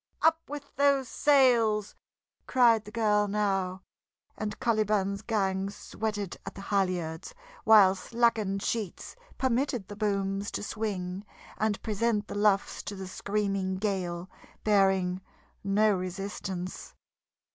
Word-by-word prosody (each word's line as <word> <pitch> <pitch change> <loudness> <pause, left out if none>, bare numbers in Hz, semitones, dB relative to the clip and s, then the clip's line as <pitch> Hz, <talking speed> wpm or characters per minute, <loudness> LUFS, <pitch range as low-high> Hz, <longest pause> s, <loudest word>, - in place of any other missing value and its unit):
"Up 320 0 +5
with 290 0 -8
those 280 -2 +3
sails!" 235 -7 +3 0.5
cried 235 -4 +4
the 210 - -10
girl 210 -2 +2
now, 195 -2 -1 0.5
and 210 -1 -4
Caliban's 210 -3 +1
gang 195 -3 0
sweated 205 -2 -4
at 195 - -8
the 195 - -8
halyards, 185 -4 -2 0.3
while 205 -4 +7
slackened 215 -1 0
sheets 215 -6 -3 0.2
permitted 255 -4 0
the 205 - -7
booms 200 -1 -1
to - - -3
swing 195 -3 -3 0.4
and 215 -2 0
present 215 -1 0
the - - -6
luffs 205 -1 +1
to 205 - -6
the 190 0 -6
screaming 195 0 -1
gale, 185 -3 -2 0.4
bearing 190 -3 +2 0.4
no 205 +1 +3
resistance. 185 0 -5
205 Hz, 115 wpm, -29 LUFS, 190-220 Hz, 0.5 s, while